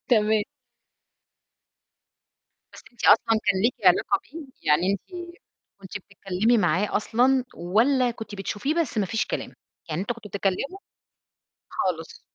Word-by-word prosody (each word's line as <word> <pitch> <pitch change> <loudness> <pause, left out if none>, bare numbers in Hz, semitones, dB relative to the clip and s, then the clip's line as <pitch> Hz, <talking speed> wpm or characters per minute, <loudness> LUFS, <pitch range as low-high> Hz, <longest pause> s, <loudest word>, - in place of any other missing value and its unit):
تمام. 215 -3 +3 2.3
بس - - -12
أنتِ 240 - -8
أصلًا 225 -1 +5
كان 190 -2 +2
ليكِ 235 +3 +3
علاقة - - +4
بيه؟ 320 -3 -10 0.2
يعني 175 +6 +3
أنتِ 345 - -7 0.5
كنتِ 195 +1 -7
بتتكلِّمي 200 +4 0
معاه 185 +2 +1
أصلًا، 250 +4 +2
والّا 240 +8 +2
كنتِ 220 -3 -8
بتشوفيه 205 +9 -2
بس 320 -9 0
ما 200 - +1
فيش 225 +3 -1
كلام، - - -4 0.4
يعني 155 +2 -2
أنتم 225 +5 -2
كنتم 220 -2 -11
بتتكلِّموا؟ 200 - -2 0.9
خالص. 165 -3 -3
215 Hz, 125 wpm, -25 LUFS, 195-250 Hz, 2.3 s, أصلًا